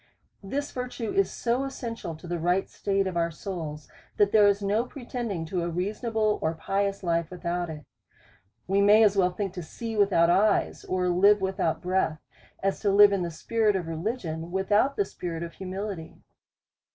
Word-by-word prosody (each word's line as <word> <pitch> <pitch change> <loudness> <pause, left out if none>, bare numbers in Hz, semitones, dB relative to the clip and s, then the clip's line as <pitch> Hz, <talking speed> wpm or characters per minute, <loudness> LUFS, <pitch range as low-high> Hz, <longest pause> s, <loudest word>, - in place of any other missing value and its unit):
This 280 +9 -3
virtue 250 -3 -4
is 195 -1 +2
so 245 +3 -1
essential 230 -10 -5
to 160 - -13
the 175 0 -2
right 180 +3 +1
state 195 -1 -1
of 185 -2 -3
our 170 0 +1
souls, 155 -3 -6 0.3
that 205 -1 +4
there 210 -2 +6
is 200 0 +2
no 205 +4 +1
pretending 240 - -5
to 175 +2 -2
a 170 - -2
reasonable 215 +4 -1
or 160 +1 0
pious 195 +4 -1
life 170 -2 0
without 175 -1 -3
it. 150 -2 -8 0.8
We 195 +2 +2
may 210 +2 +6
as 205 -2 +4
well 185 -2 +3
think 190 +1 -4
to 180 - -5
see 225 +7 -6
without 190 -5 +4
eyes, 200 +3 +2
or 185 -1 0
live 200 +4 +5
without 190 -4 -1
breath, 180 -3 0 0.5
as 195 0 0
to 205 - +1
live 200 +1 +7
in 195 - 0
the 175 - -2
spirit 215 +5 0
of 180 -3 -1
religion, 165 -1 -4
without 205 +9 +2
the 200 - +1
spirit 170 -3 -5
of 170 - -7
humility. 190 -2 -6
195 Hz, 180 wpm, -27 LUFS, 170-210 Hz, 0.8 s, live